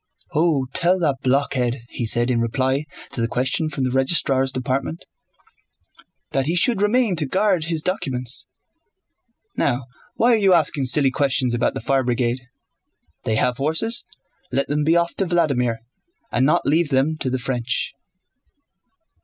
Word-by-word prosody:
"Oh, 155 -4 +2
tell 185 +1 +3
that 150 -7 0
blockhead," 130 -2 0
he 120 - -3
said 120 +3 +2
in 120 - +1
reply 130 +5 0 0.3
to 120 - -2
the 115 - +1
question 130 +6 -1
from 135 -3 -3
the 130 - 0
Registrar's 135 0 +1
Department, 135 +5 -3 1.3
"that 135 0 0
he 165 - 0
should 200 +4 +2
remain 215 -1 +2
to 150 -3 0
guard 185 0 +1
his 160 -2 -2
documents. 130 -10 -1 1.1
Now 120 +1 0 0.3
why 240 +1 +3
are - - +4
you 195 -4 +4
asking 150 -4 +1
silly 135 +1 +4
questions 130 -2 0
about 120 - 0
the - - -4
Fire 135 +3 +1
Brigade? 120 0 -1 0.8
They 110 - 0
have 125 +2 +1
horses, 160 +12 +2 0.5
let 135 +2 0
them 150 +1 0
be 160 +3 +3
off 170 0 +1
to 195 - +1
Vladímir, 140 -9 +1 0.5
and 130 +2 +2
not 150 - +2
leave 160 +2 +2
them 135 +3 +1
to 130 - -1
the 130 - -1
French." 125 0 -2
135 Hz, 155 wpm, -21 LUFS, 125-165 Hz, 1.3 s, are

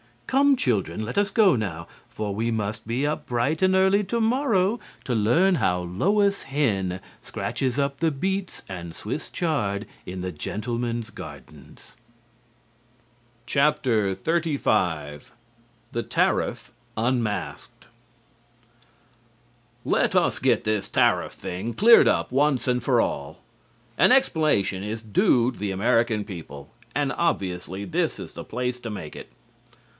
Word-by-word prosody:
Come, 275 +1 +4
children, 110 - -1
let 115 - -6
us 205 0 +3
go 200 - +4
now, 85 -7 -4 0.2
for 105 -2 -4
we 115 +3 -1
must 110 0 -3
be 125 +5 0
up 150 +1 -2
bright 125 +7 0
and 190 0 +4
early 190 +2 +4
to 235 +4 -1
morrow 225 -3 +2 0.2
to 125 - -2
learn 125 - +3
how 90 - +1
Lois 200 - +1
Hen 100 -10 -1 0.2
scratches 130 -1 -3
up 140 -1 -1
the 165 -1 +2
beets 190 +6 -3
and 85 -3 -7
Swiss 125 +9 -5
chard 110 - -1 0.2
in 90 0 -6
the 90 0 -3
gentlemen's 115 +7 -3
gardens." - - -12 1.5
XXXV 120 - +1 0.7
THE - - -2
TARIFF - - 0 0.3
UNMASKED 115 -4 -2 2.0
Let - - +1
us - - +2
get - - +2
this 105 -2 -1
tariff - - +2
thing 100 +7 -5
cleared 230 - +7
up, - - +1
once 135 0 +2
and 125 0 +1
for 125 -1 +3
all. 70 +4 -3 0.6
An - - +6
explanation 155 - +2
is 110 +2 -4
due 115 +3 +2
the 105 -4 -4
American 115 +2 +1
people, 80 -8 -9 0.2
and 145 -2 +1
obviously 95 - -2
this 95 - -1
is - - -9
the - - -8
place 125 0 -3
to 120 - -6
make 90 -8 -7
it. - - -10
120 Hz, 130 wpm, -25 LUFS, 100-155 Hz, 2.0 s, cleared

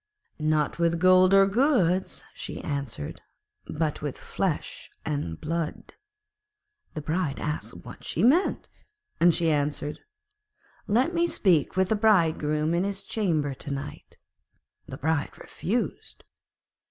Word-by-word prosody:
'Not 155 0 +1
with 170 0 +2
gold 185 +1 +6
or 195 0 +7
goods,' 195 - +1
she - - -6
answered; 140 - -4 0.5
'but 155 -1 -2
with 145 -3 -4
flesh 185 -6 -3 0.2
and 140 - -3
blood.' 165 0 -4 1.0
The 155 - -3
Bride 155 -2 -1
asked 140 -8 -5
what 125 - -11
she 170 - -2
meant, 310 - +3 0.5
and 175 +1 +6
she 165 0 +1
answered, 145 0 -1 0.9
'Let 250 +10 +2
me 340 0 +2
speak 180 - +2
with 190 0 +3
the 220 - +3
Bridegroom 160 -7 +2
in 175 +2 +2
his 200 0 -3
chamber 160 -10 0
to 135 - -8
night.' 140 +1 -7 0.7
The 130 - -7
Bride 160 0 -1
refused. 235 +7 -4
165 Hz, 125 wpm, -27 LUFS, 150-195 Hz, 1.0 s, or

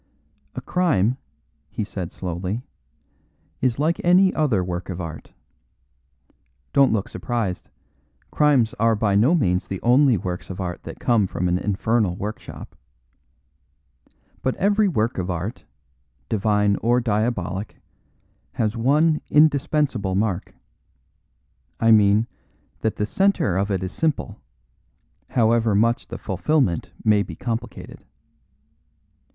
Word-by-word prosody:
"A - - -4
crime," 130 - +1 0.5
he - - -3
said 95 -4 -6
slowly, 95 +6 -4 1.0
"is 125 -2 +1
like 160 +4 0
any 185 +2 +5
other 130 -12 +1
work 90 0 -5
of 90 -1 -5
art. 80 -3 -7 1.4
Don't 140 -1 +5
look 105 -3 0
surprised; 115 -7 -3 0.6
crimes 140 -7 +3
are 115 0 +3
by 105 -1 +1
no 120 - +4
means 90 - +1
the 95 - -4
only 125 0 +4
works 90 -1 -5
of 95 - -7
art 90 -2 -4
that - - -8
come 115 -5 +2
from 90 0 -2
an 90 +1 +1
infernal 105 -1 0
workshop. 105 +4 -7 1.7
But 130 - -1
every 205 +2 +2
work 115 - 0
of 90 0 -3
art, 95 +7 -4 0.6
divine 105 -1 +2
or 120 +2 +2
diabolic, 105 -4 -2 0.8
has 110 0 -1
one 150 +7 +2
indispensable 145 -8 +2
mark 100 -2 -2 1.2
I 115 0 +4
mean, 105 0 +5 0.5
that 110 - -1
the 105 - -1
centre 190 - +1
of 100 +2 0
it 95 -2 -1
is 95 - -4
simple, 155 +4 -2 0.9
however 115 -2 +2
much 115 +3 +1
the - - -7
fulfilment 100 - 0 0.2
may 105 -2 +4
be 90 -5 -6
complicated. 115 +4 -6
110 Hz, 120 wpm, -23 LUFS, 95-130 Hz, 1.7 s, any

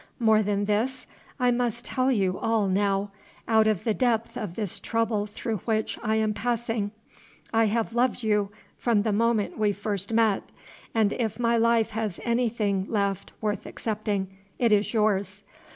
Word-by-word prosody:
More 220 -3 +4
than 205 -1 0
this. 245 +5 0 0.3
I 250 -1 +3
must 240 0 -1
tell 260 +1 +1
you 190 -6 +1
all 225 -3 +1
now, 195 +1 +1 0.4
out 220 -1 +4
of 215 -5 +1
the 225 - +1
depth 230 -1 0
of 205 -6 -5
this 210 -5 -2
trouble 225 -2 0
through 215 +1 -3
which 220 +3 -1
I 220 +1 0
am 220 -1 +1
passing. 225 -2 -1 0.6
I 225 0 +4
have 225 +1 0
loved 245 0 +1
you 210 -2 +2 0.3
from 225 -4 +2
the 215 -2 0
moment 225 -1 +1
we 210 -1 +2
first 200 0 -3
met; 225 -3 +3 0.5
and 215 -2 +3
if 225 -4 -2
my 235 -1 +2
life 230 -1 +3
has 215 -4 -3
anything 220 -5 0
left 200 -3 -1
worth 210 -2 -2
accepting, 205 -3 -3 0.2
it 235 -3 +2
is 210 0 +3
yours. 205 -3 0
215 Hz, 165 wpm, -26 LUFS, 205-230 Hz, 0.6 s, More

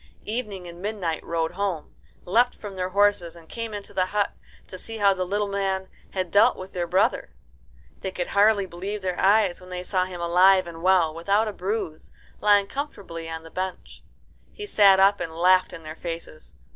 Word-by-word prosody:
Evening 210 -5 -4
and 170 0 -10
Midnight 195 -6 -3
rode 165 -1 -1
home, 185 -4 -3 0.3
leapt 240 +7 +3
from 205 -2 -9
their 185 0 -2
horses, 200 -3 +2
and 165 -1 -15
came 230 +3 -5
into 205 -1 -7
the 185 -2 +1
hut 205 0 0 0.3
to 185 - -10
see 225 +3 -5
how 200 -2 +4
the 185 -1 -2
little 205 +2 0
man 195 -1 -2 0.2
had 185 -3 -3
dealt 205 +2 +5
with 185 +1 -9
their 175 -1 -2
brother. 185 +3 +1 0.6
They 190 - -4
could 180 -1 -3
hardly 205 0 +4
believe 190 +3 -6
their 185 -1 -2
eyes 200 -2 +3
when 185 - -13
they 180 0 -5
saw 185 0 0
him 180 -1 -8
alive 185 +2 +5
and 165 -1 -9
well, 180 -3 +3
without 200 +7 +1
a 210 - -3
bruise, 190 -5 -4 0.3
lying 205 -1 +4
comfortably 195 - -6
on 160 0 -6
the 165 - -13
bench. 185 0 -5 0.5
He 420 - -8
sat 200 - +5
up 200 +1 +5
and 160 - -4
laughed 185 +2 +4
in 165 - -10
their 155 0 -7
faces. 165 - -8
190 Hz, 195 wpm, -25 LUFS, 175-205 Hz, 0.6 s, dealt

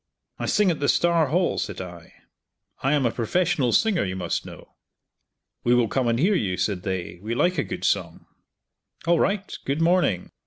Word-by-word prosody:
"I - - -2
sing 205 -3 +3
at 160 - -3
the 145 - +1
Star 170 -3 +3
Hall," 175 +5 +1
said 105 -4 -4
I, 85 -2 -9 0.7
"I 135 +2 +1
am 145 -3 +2
a 120 - +2
professional 135 +2 0
singer, 215 - +2
you 95 -1 -3
must 90 -2 -3
know." - - -12 0.9
"We 120 +1 +4
will 120 -2 +3
come 130 +2 0
and 115 0 +2
hear 180 - +3
you," 95 - 0
said 90 +1 -1
they, 90 -2 -4
"we 110 +3 -3
like 175 +5 +1
a - - +2
good - - -6
song." - - -1 0.8
"All 170 -1 +3
right! 200 0 0
Good 140 +3 -1
morning!" 165 - +2
135 Hz, 190 wpm, -24 LUFS, -, 0.9 s, We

